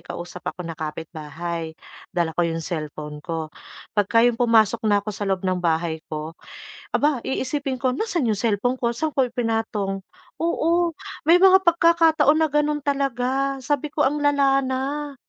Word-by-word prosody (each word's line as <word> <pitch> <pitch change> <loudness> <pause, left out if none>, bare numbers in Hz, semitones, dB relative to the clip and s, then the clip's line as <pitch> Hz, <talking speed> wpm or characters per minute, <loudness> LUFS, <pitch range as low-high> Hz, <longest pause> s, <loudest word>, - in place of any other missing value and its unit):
kausap 175 +1 -8
ako 180 - -6
na 165 - -5
kapitbahay, 160 +1 -6 0.3
dala 170 -2 -1
ko 170 +1 +1
'yong 165 0 -3
cellphone 150 -3 -5
ko. 160 -1 -5 0.4
'Pagka 220 +3 +3
'yong 240 -1 +2
pumasok 230 -1 +4
na 205 -1 +2
ako 215 - -4
sa 200 0 -4
loob 190 -1 -1
ng 185 -1 0
bahay 165 -1 0
ko, 155 +1 -5 0.6
aba, 290 -5 +1
iisipin 265 0 -2
ko, 255 -1 0
"Nasaan 345 - -1
'yong 215 - +2
cellphone 230 +3 +1
ko, 235 -2 -1
saan 310 +5 -3
ko 270 - +4
ipinatong?" 225 -5 -2 0.4
Oo, 340 +1 +1 0.3
may 335 +4 +6
mga 380 0 +6
pagkakataon 330 -3 +4
na 310 - 0
ganun 295 0 +1
talaga, 275 -1 -1
sabi 290 +2 0
ko, 295 0 -1
"Ang 290 +3 +1
lala 280 -2 +3
na." 275 +2 -3
245 Hz, 160 wpm, -23 LUFS, 175-290 Hz, 0.6 s, may